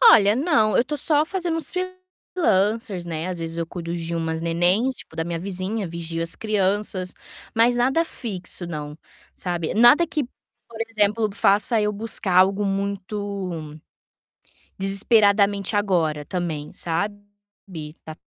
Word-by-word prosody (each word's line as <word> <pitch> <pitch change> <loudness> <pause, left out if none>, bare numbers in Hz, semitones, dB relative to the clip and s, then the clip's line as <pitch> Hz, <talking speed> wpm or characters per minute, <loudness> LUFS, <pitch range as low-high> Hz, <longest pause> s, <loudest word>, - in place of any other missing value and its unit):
Olha 210 - +7
não, 260 - +2
eu - - +5
estou 295 +4 -4
só 295 +1 +3
fazendo 345 -1 -2
uns 315 -4 -2
freelancers, 255 - -1
né 165 +1 -4
às 180 - -4
vezes 165 0 -5
eu 165 - -1
cuido 170 0 -5
de 170 0 -4
umas 160 -1 -2
nenéns 175 +10 +1
tipo - - -12
da 165 - -1
minha 170 0 -3
vizinha, 190 +3 -2
vigio 165 0 -4
as 165 - -3
crianças, 200 -3 -1 0.4
mas 235 +2 +4
nada 265 +7 +2
fixo 190 - -4
não, 150 -3 -6 0.4
sabe. 175 -3 -2
Nada 240 +10 +6
que, 305 -2 -1 0.4
por 225 -1 -11
exemplo 215 0 +1
faça 205 +3 +3
eu 210 0 +1
buscar 205 -3 -2
algo 195 +2 +4
muito, 200 0 -3 1.3
desesperadamente 200 0 +3
agora 165 -7 +1
também, 160 -4 -4
sabe, 200 +5 -2 0.8
tá 155 - -8
200 Hz, 140 wpm, -23 LUFS, 175-225 Hz, 1.3 s, Olha